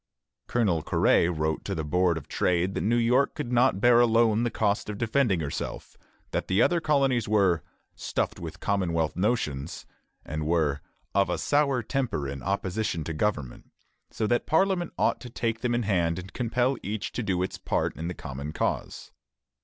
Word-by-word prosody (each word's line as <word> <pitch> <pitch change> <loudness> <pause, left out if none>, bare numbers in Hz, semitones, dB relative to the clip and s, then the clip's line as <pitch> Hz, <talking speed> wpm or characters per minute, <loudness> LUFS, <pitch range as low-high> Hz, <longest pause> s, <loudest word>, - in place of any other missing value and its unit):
Colonel 100 -9 +1
Quary 85 - +3
wrote 80 -2 -1
to 100 - -3
the 80 - -2
Board 90 +2 +2
of - - -8
Trade 90 +1 +1
that - - -2
New 115 +3 +2
York 125 +4 +2
could 140 -5 -4
not 125 -4 +3
bear 120 +2 +6
alone 115 -2 +4
the 120 - +1
cost 105 -2 0
of 105 - -4
defending 115 -5 +1
herself; 70 -2 -5 0.4
that - - -2
the 95 +2 +1
other 175 -1 +3
colonies 135 -7 +2
were 95 -6 +3 0.3
"stuffed - - -2
with 85 +1 -7
commonwealth 85 -5 0
notions," 85 - -1 0.4
and 75 0 -3
were 75 -4 +1 0.3
"of 100 -1 +2
a - - 0
sour 140 -4 +1
temper 125 - -2
in 70 0 -6
opposition 95 -2 -2
to 80 - -4
government," 75 -7 -2 0.4
so 110 - -2
that 120 +3 +1
Parliament 175 +1 +2
ought - - +1
to 125 - -8
take 115 -1 -2
them 120 -1 0
in 120 - 0
hand 85 -5 +1
and 95 +1 -8
compel 125 +2 0
each 105 +2 -4
to - - -3
do 95 -5 0
its 95 - -4
part - - -1
in 80 +2 -5
the 90 - -4
common 70 +1 -6
cause. - - -3
100 Hz, 180 wpm, -27 LUFS, 85-120 Hz, 0.4 s, bear